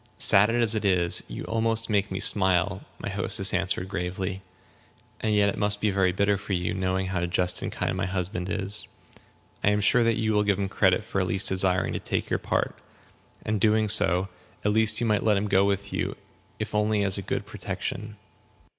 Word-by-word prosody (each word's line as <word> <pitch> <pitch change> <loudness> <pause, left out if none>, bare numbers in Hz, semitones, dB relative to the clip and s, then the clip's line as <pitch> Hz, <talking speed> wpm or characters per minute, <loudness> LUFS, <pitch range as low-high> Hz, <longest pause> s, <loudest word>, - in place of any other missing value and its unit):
"Sad 100 +2 +3
as 115 -1 +2
it 110 -1 -2
is, 90 -3 +2
you - - -7
almost 115 0 -1
make 100 -2 0
me 95 - -4
smile," 95 -1 +3 0.2
my - - -7
hostess 95 0 +1
answered, 95 0 -1
gravely; 95 +1 -4 0.8
"and 110 -1 0
yet 100 -1 +3
it - - -5
must 105 0 0
be 105 -1 0
very 95 -1 +1
bitter 100 +2 +1
for 100 0 -5
you, 90 -1 -1
knowing 95 0 -1
how 90 -2 -2
just 90 0 0
and - - -4
kind - - -3
my 95 0 -2
husband 90 -1 -3
is. 100 0 -2 0.8
I - - +4
am 105 0 +1
sure 115 +4 +3
that 115 -1 +1
you 110 -1 0
will 105 - +3
give 100 -2 +1
him 100 -1 -2
credit 95 0 +2
for 100 -3 -2
at 95 - -1
least 95 +2 +3
desiring 95 -1 +1
to - - -3
take - - -3
your - - +1
part. - - -2 0.7
And 110 -2 -1
doing 110 0 +3
so, 95 -2 +4 0.4
at 105 - +3
least 110 0 +5
you - - +1
might 105 -3 +1
let 105 -2 +2
him 100 +2 -1
go 95 0 +3
with 100 0 -2
you, - - -2 0.4
if - - -5
only 105 0 +1
as 100 0 +2
a - - -4
good 100 - -4
protection." 105 +1 -6
100 Hz, 210 wpm, -25 LUFS, 95-105 Hz, 0.8 s, least